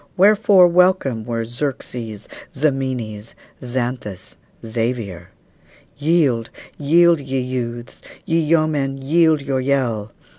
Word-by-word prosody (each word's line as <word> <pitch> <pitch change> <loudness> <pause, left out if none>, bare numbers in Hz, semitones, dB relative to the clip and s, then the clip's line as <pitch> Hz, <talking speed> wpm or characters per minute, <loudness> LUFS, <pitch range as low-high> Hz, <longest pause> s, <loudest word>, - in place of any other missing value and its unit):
Wherefore 200 -1 +6
welcome 175 - +2
were 115 -1 -3
Xerxes, 120 -4 -5 0.3
Ximenes, 130 -7 -2 0.3
Xanthus, 120 -6 -4 0.3
Xavier? 110 -6 -3 0.7
Yield, 145 -7 +1 0.3
yield, 170 +3 +4
ye 135 -1 -3
youths! 120 -2 -5 0.2
ye 165 0 +1
yeomen, 155 -4 +1
yield 155 +2 +2
your 135 -1 -1
yell! 125 -6 -1
130 Hz, 90 wpm, -20 LUFS, 115-155 Hz, 0.7 s, Wherefore